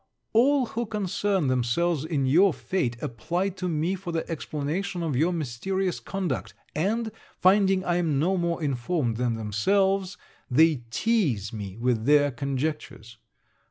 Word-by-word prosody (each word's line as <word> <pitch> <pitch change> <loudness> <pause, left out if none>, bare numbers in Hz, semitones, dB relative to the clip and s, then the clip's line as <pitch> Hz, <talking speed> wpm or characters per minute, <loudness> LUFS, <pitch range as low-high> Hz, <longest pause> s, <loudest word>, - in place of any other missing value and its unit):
All 260 +4 +4
who 235 0 -4
concern 200 -3 0
themselves 130 +5 +1
in 150 -5 0
your 170 +6 +4
fate, 125 -11 -2
apply 175 - -1
to 185 -1 -4
me 165 +3 0
for 190 -2 -5
the 165 -1 -2
explanation 165 +4 -3
of 155 -5 -1
your 160 +7 +2
mysterious 175 +5 -2
conduct; 195 -3 -3 0.2
and, 220 +7 0 0.3
finding 190 0 +4
I 175 0 +1
am 160 -5 +1
no 175 +7 +2
more 170 -2 -1
informed 130 -2 -1
than 120 -1 0
themselves, 190 - +1 0.3
they 155 +4 +5
teaze 135 - 0
me 100 -2 -6
with 115 -2 0
their 145 0 +4
conjectures. 135 -3 -4
165 Hz, 140 wpm, -26 LUFS, 130-190 Hz, 0.3 s, they